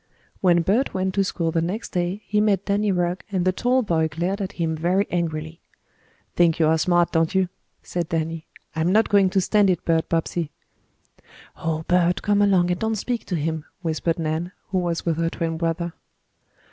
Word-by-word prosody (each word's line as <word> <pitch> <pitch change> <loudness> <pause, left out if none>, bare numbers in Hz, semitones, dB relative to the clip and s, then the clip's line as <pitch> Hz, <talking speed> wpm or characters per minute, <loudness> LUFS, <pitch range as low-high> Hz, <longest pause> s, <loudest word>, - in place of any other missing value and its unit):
When 175 -2 +4
Bert 215 +9 +1
went 190 0 0
to 195 - +2
school 170 -4 -1
the 165 - +1
next 190 +7 -3
day 180 +3 -2
he 210 0 +1
met 200 -3 +2
Danny 205 0 +1
Rugg 180 0 0
and 185 -3 0
the 185 - +4
tall 250 +7 +1
boy 165 -6 +1
glared 175 +6 -2
at 195 0 -4
him 165 -2 -1
very 180 +5 +1
angrily. 160 -1 -3 0.7
"Think 170 -2 +4
you 160 - +4
are 160 +1 +3
smart, 175 +1 +2
don't 165 +3 +1
you?" 190 -2 +2 0.3
said 170 -2 -3
Danny. 165 0 -2 0.3
"I'm 160 +3 +1
not 220 +3 +3
going 200 -2 +4
to 190 - +2
stand 200 +1 +3
it, 180 -3 0
Bert 165 -1 +1
Bobbsey." 165 -1 -1 1.1
"Oh, 160 -1 -3
Bert, 180 0 +2
come 205 -1 +3
along 185 -3 +3
and 180 - -1
don't 220 0 0
speak 235 +3 -3
to 180 - -1
him," 160 0 -2 0.2
whispered 165 0 -1
Nan, 165 +3 -2 0.2
who 190 - +1
was 170 -2 -2
with 165 -2 0
her 165 0 +1
twin 165 -1 -3
brother. 170 +1 -2
175 Hz, 195 wpm, -23 LUFS, 165-195 Hz, 1.1 s, When